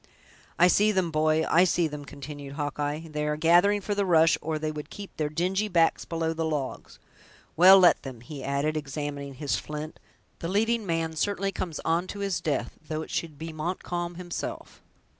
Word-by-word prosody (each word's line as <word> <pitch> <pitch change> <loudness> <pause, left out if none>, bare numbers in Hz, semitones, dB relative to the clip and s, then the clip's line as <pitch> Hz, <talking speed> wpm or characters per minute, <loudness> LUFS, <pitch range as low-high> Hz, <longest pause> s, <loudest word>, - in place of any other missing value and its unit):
"I 175 - +6
see 210 +4 +4
them, 185 -4 0
boy, 155 0 +2
I 170 - +5
see 175 -2 +2
them!" 150 -1 -7
continued 140 0 -8
Hawkeye; 145 +2 -3
"they 150 0 -2
are 150 0 -1
gathering 175 +6 +4
for 205 - -2
the 205 0 +1
rush, 165 -3 +5
or 155 0 -2
they 155 0 -2
would 150 0 -7
keep 200 -1 -9
their 150 -1 -1
dingy 185 +7 0
backs 170 -4 +2
below 165 -1 -1
the 165 0 -2
logs. 150 -4 -4 0.6
Well, 185 +3 +9
let 180 -2 +5
them," 130 -5 -8
he 135 +2 -8
added, 140 +3 0
examining 140 -1 -4
his 140 +1 -1
flint; 150 +1 -6 0.4
"the 165 - -4
leading 220 +3 +1
man 165 -1 -1
certainly 195 +3 0
comes 175 -4 -4
on 170 +3 +1
to 205 - -7
his 195 -3 -1
death, 145 -4 -2
though 155 0 -3
it - - -11
should 155 -4 -3
be 160 +1 -6
Montcalm 175 +2 -3
himself!" 175 -1 -6
160 Hz, 190 wpm, -27 LUFS, 150-180 Hz, 0.6 s, Well